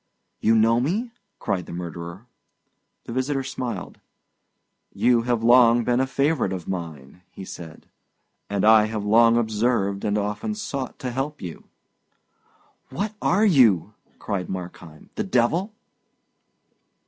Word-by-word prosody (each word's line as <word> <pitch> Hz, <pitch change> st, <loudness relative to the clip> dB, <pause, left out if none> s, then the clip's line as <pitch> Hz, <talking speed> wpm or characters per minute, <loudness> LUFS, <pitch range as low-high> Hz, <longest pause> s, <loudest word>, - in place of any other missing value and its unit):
"You 115 Hz, -, +3 dB
know 115 Hz, +1 st, +4 dB
me?" 205 Hz, -, -1 dB, 0.3 s
cried 90 Hz, -3 st, -3 dB
the -, -, -8 dB
murderer. 85 Hz, +3 st, -7 dB, 0.8 s
The 115 Hz, -, -7 dB
visitor 135 Hz, +2 st, -1 dB
smiled. 130 Hz, -2 st, -5 dB, 1.0 s
"You 120 Hz, -1 st, +3 dB
have 120 Hz, -2 st, 0 dB
long 120 Hz, 0 st, +6 dB
been 120 Hz, +1 st, +1 dB
a 130 Hz, -, +1 dB
favourite 140 Hz, -5 st, 0 dB
of 90 Hz, -3 st, -5 dB
mine," 80 Hz, -4 st, -6 dB
he 95 Hz, -, -10 dB
said; 80 Hz, -3 st, -10 dB, 0.6 s
"and 100 Hz, 0 st, 0 dB
I 110 Hz, -1 st, +7 dB
have 110 Hz, -1 st, -4 dB
long 115 Hz, +2 st, +5 dB
observed 110 Hz, -3 st, 0 dB
and 105 Hz, 0 st, 0 dB
often 105 Hz, -, -3 dB
sought 140 Hz, -12 st, -5 dB
to 125 Hz, -, -4 dB
help 135 Hz, +4 st, -3 dB
you." 85 Hz, -4 st, -8 dB, 1.2 s
"What 205 Hz, +3 st, -3 dB
are 200 Hz, +5 st, +3 dB
you?" 125 Hz, -, +4 dB, 0.2 s
cried 95 Hz, -5 st, -4 dB
Markheim; 90 Hz, -4 st, -8 dB
"the 215 Hz, -, -2 dB
devil?" 175 Hz, -, +1 dB
115 Hz, 130 wpm, -23 LUFS, 95-130 Hz, 1.2 s, I